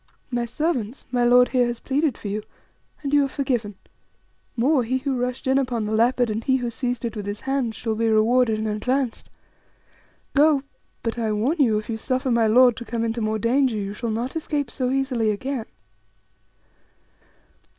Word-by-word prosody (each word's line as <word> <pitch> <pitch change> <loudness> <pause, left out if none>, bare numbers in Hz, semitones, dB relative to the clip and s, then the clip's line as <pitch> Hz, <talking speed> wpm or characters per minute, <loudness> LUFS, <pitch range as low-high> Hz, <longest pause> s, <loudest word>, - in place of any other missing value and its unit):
My 240 -1 0
servants, 250 -2 -2
my 245 -1 +1
lord 245 +1 +5
here 250 -2 +2
has 240 -1 -4
pleaded 280 -1 0
for - - -7
you, 205 +2 -2 0.6
and 280 0 -3
you 290 -1 +5
are - - +1
forgiven; 245 -7 -2 0.8
more, 260 +3 +3
he 255 +3 0
who 270 0 -2
rushed 250 +1 -3
in 265 +1 +3
upon 245 -5 -1
the 210 - -3
leopard 235 +1 +2
and 220 +2 -3
he 260 - +2
who 245 -2 -3
seized 245 0 -3
it 230 - -4
with 205 -2 -5
his 205 +1 -4
hands 270 -4 -1
shall 225 -2 -2
be 225 +1 0
rewarded 225 +1 +3
and 220 0 -2
advanced. 245 +4 -1 1.0
Go; 290 -1 +4 0.4
but 230 +1 -2
I 220 -2 0
warn 245 +11 0
you 230 -7 +4
if 215 - -4
you 225 - -3
suffer 255 +3 -1
my 230 -1 +3
lord 245 +1 +5
to 235 - -6
come 230 0 -2
into 230 0 -2
more 215 0 0
danger, 245 +2 +2
you 200 -1 -3
shall 235 +2 -4
not 235 +6 -3
escape 295 -5 -2
so 255 -2 -1
easily 260 -4 0
again." 235 +3 -3
245 Hz, 190 wpm, -23 LUFS, 220-265 Hz, 1.0 s, lord